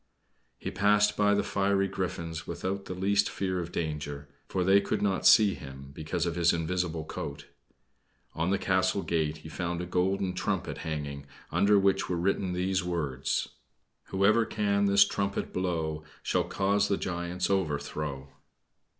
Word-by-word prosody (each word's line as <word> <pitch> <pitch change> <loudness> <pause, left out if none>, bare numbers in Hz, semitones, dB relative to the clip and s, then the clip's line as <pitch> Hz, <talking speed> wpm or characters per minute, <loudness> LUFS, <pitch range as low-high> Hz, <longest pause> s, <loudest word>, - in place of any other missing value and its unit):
He - - -5
passed 105 +2 +3
by 105 0 +3
the 100 - +1
fiery 100 0 +1
griffins 85 -4 -4
without 95 +1 -3
the 90 - -5
least 100 +2 +2
fear 95 -2 -2
of 85 -1 -5
danger; 75 -3 -4 0.2
for 95 - -1
they 95 +2 +5
could - - -1
not 95 -2 +2
see 105 -3 +7
him, 70 0 -10
because 80 +4 -2
of 85 - -1
his 85 0 +3
invisible 85 -1 -2
coat. 70 -1 -6 0.9
On 80 +3 -1
the 100 - +2
castle 95 0 +1
gate 80 -2 0
he 80 - -11
found 85 +1 -3
a 90 - -3
golden 90 +1 0
trumpet - - -2
hanging, 70 -3 -5 0.2
under 105 0 +4
which 95 0 +2
were 90 - 0
written 95 +1 0
these 90 +1 0
words 75 -7 -1 0.6
"Whoever 105 +4 +3
can 100 -2 +1
this 100 0 +6
trumpet 100 0 -2
blow, 80 -4 -2 0.2
Shall - - +1
cause 100 +1 +1
the 100 - +1
giant's 85 +1 -2
overthrow." 75 -5 -2
90 Hz, 155 wpm, -29 LUFS, 80-100 Hz, 0.9 s, see